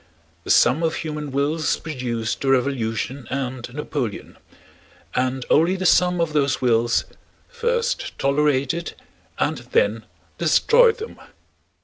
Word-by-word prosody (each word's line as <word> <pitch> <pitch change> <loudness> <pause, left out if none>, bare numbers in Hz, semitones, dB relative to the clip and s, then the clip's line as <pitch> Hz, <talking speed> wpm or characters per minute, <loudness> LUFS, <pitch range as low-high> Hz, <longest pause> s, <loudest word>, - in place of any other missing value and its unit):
The - - -8
sum 135 +7 +4
of 165 -1 0
human 150 -2 -5
wills 145 +3 0
produced 125 -7 -4
the 135 - 0
Revolution 125 -1 -1
and 130 -2 -4
Napoleon, 135 -5 -4 0.8
and 130 0 -1
only 170 +5 +3
the 185 0 -4
sum 180 0 +4
of 165 -2 0
those 140 -2 +1
wills 120 -2 +2 0.4
first 475 0 -2
tolerated 140 +3 0 0.4
and - - 0
then 475 +2 0 0.3
destroyed 480 -1 +4
them. 445 0 -8
140 Hz, 115 wpm, -22 LUFS, 130-170 Hz, 0.8 s, sum